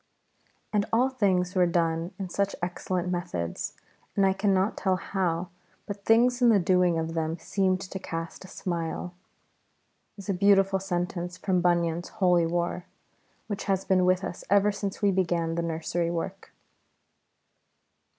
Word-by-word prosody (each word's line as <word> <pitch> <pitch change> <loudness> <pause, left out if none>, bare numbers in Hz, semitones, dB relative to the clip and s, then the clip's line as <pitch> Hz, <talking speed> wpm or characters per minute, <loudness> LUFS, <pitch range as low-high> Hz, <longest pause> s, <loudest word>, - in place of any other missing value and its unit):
] - - -41
"AND 205 -1 +2
all 245 +4 +3
things 190 -8 +1
were 180 -2 +4
done 165 0 0
in 195 - -4
such 200 +2 -1
excellent 180 0 -2
methods, 170 - -3 0.4
and 195 - +4
I 190 - +4
cannot 195 0 +1
tell 190 -3 +1
how, 180 -2 -2 0.4
but 200 -1 -7
things 245 +3 +4
in 245 - +6
the 220 - +6
doing 180 -2 +3
of 165 0 -2
them 160 0 -1
seemed 185 +1 0
to 190 0 -6
cast 165 0 -6
a - - -11
smile" 175 0 -4 1.0
is 200 - -10
a 200 - +1
beautiful 195 0 +4
sentence 175 -1 -3
from 185 -2 +1
Bunyan's 170 -1 +1
Holy 175 -3 +3
War, 175 +1 -2 0.6
which 205 -1 -4
has 195 -1 0
been 185 -1 +3
with 185 +1 +3
us 180 - -5
ever 200 +1 +4
since 200 +1 -5
we 200 - +5
began 170 -3 0
the 170 - -1
Nursery 165 +1 -1
work. 175 +3 -5
185 Hz, 155 wpm, -27 LUFS, 170-195 Hz, 1.0 s, in